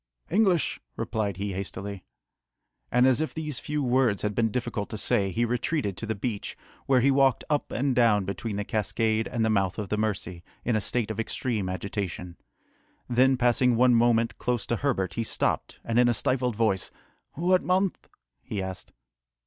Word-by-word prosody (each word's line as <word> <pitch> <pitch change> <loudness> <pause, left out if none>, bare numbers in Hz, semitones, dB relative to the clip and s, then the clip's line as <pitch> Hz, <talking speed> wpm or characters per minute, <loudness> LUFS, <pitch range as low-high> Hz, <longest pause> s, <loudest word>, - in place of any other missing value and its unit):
"English," 190 -4 +2
replied 105 -4 -2
he 100 0 -3
hastily. 100 +1 -5 0.9
And 125 +1 +4
as 130 +2 +4
if 155 - -3
these 155 -4 -3
few 150 -1 -2
words 125 -5 +2
had 105 0 0
been 115 +1 +1
difficult 120 -2 -3
to 110 - -5
say, 100 -1 +1
he 115 +6 0
retreated 120 - -1
to 110 - -5
the 110 - -1
beach, 105 0 -4 0.3
where 130 -2 +4
he 140 +3 +4
walked 135 -2 +3
up 145 - 0
and 135 +1 0
down 110 -5 +4
between 100 +2 -4
the 105 - -2
cascade 110 0 0
and 115 -2 0
the 110 - +2
mouth 95 -3 +1
of 105 -4 -4
the 105 - 0
Mercy, 95 -5 -2 0.2
in 120 - +1
a 110 - +1
state 115 0 0
of 110 - -5
extreme 115 -3 -2
agitation. 95 -2 -4 0.7
Then, 130 +2 +4
passing 125 0 +3
one 125 +1 +5
moment 115 -1 +3
close 125 -2 -1
to 120 - -1
Herbert, 115 -9 -1
he 115 - -1
stopped, - - -1
and 115 +1 +1
in 120 0 +5
a 120 - +2
stifled 125 0 0
voice, 105 -4 +1 0.4
"What 180 +4 +2
month?" 185 +1 0 0.3
he 105 - -5
asked. 95 -1 -6
115 Hz, 180 wpm, -27 LUFS, 100-125 Hz, 0.9 s, one